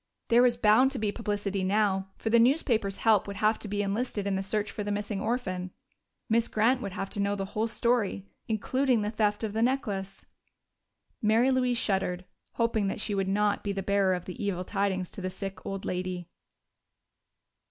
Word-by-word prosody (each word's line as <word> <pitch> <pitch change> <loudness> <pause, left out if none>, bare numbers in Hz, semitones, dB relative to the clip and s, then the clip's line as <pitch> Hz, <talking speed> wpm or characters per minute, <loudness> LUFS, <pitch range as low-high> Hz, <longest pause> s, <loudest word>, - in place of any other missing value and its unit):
There 235 +1 +6
was 245 -1 +4
bound 230 +4 +5
to - - -3
be 210 -1 0
publicity 205 -3 -2
now, 195 -1 +1
for 225 - -2
the 235 - +6
newspapers' 230 -6 +2
help 215 -4 +3
would 200 - -5
have 215 +2 +2
to - - -5
be 205 0 -1
enlisted 205 0 -2
in 200 -1 0
the 190 - -1
search 205 +2 -1
for 210 - -4
the 205 - -3
missing 205 -1 -2
orphan. 185 -7 -2 0.6
Miss 230 0 +3
Grant 240 +4 +2
would 200 -2 -5
have 195 0 -4
to - - -5
know 200 0 +1
the 195 -1 -3
whole 220 +2 0
story, 225 -3 0 0.2
including 235 +2 +1
the 210 - -1
theft 210 -1 0
of 215 -2 -2
the 220 - 0
necklace.... 205 -6 -1 1.0
Mary 225 +5 +4
Louise 250 -2 +2
shuddered, 190 -4 -1 0.3
hoping 230 -3 +1
that 195 - -3
she 210 0 -2
would 195 -1 0
not 205 +1 +1
be 200 - -1
the 195 -1 -3
bearer 195 -1 +2
of 180 - -6
the 185 +3 -6
evil 185 -3 -1
tidings 195 -3 -1
to - - -8
the 185 - -2
sick 195 +1 -7
old 195 -1 -4
lady. 180 -1 -3
205 Hz, 195 wpm, -28 LUFS, 195-225 Hz, 1.0 s, There